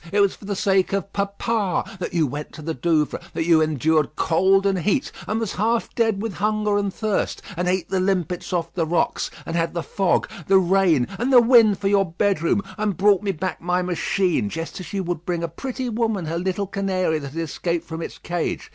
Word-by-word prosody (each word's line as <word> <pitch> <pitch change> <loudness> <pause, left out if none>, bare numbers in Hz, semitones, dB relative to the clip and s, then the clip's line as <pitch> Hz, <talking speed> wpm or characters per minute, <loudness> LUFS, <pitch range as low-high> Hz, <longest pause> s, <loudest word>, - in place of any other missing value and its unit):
It 205 - +2
was 200 -1 +4
for - - -14
the 200 0 -2
sake 190 0 +2
of 195 0 -2
papa 200 0 -1
that 180 - -3
you 170 -3 +2
went 145 +2 -6
to 155 - -9
the 160 +1 -2
Douvres, 155 +1 0
that 165 - -1
you 165 -2 +5
endured 155 0 +1
cold 190 +5 +3
and 195 -2 +2
heat, 210 - 0 0.2
and 215 +1 -1
was 225 -4 -2
half 230 +1 0
dead 220 -3 +1
with 225 -3 -3
hunger 210 +2 0
and 200 -1 -1
thirst, 215 0 -2
and 180 +1 -1
ate 180 -1 0
the 190 - 0
limpets 180 -2 -1
off 170 -2 -2
the 165 -3 -1
rocks, 170 +2 0 0.2
and 165 - -4
had 165 0 0
the 170 - -2
fog, 190 +5 +1 0.2
the 195 - +6
rain, 180 -7 +3
and 245 +3 0
the 250 - +9
wind 230 -4 +6
for 195 0 -2
your 195 -3 +2
bedroom, 190 0 +1 0.2
and 210 -5 -1
brought 200 0 +4
me 200 -2 0
back 185 +1 -4
my 180 +1 0
machine, 180 - 0
just 165 - -5
as 185 - -8
you 195 -1 -2
might 175 -2 -3
bring 175 -1 -2
a - - 0
pretty 255 - -5
woman 220 -5 -1
her 165 +2 -2
little 190 +2 -1
canary 185 -4 -1
that 140 -2 -8
had 165 - -4
escaped 170 +2 -2
from 160 0 -6
its - - -6
cage. 175 -1 -3
185 Hz, 220 wpm, -23 LUFS, 165-200 Hz, 0.2 s, the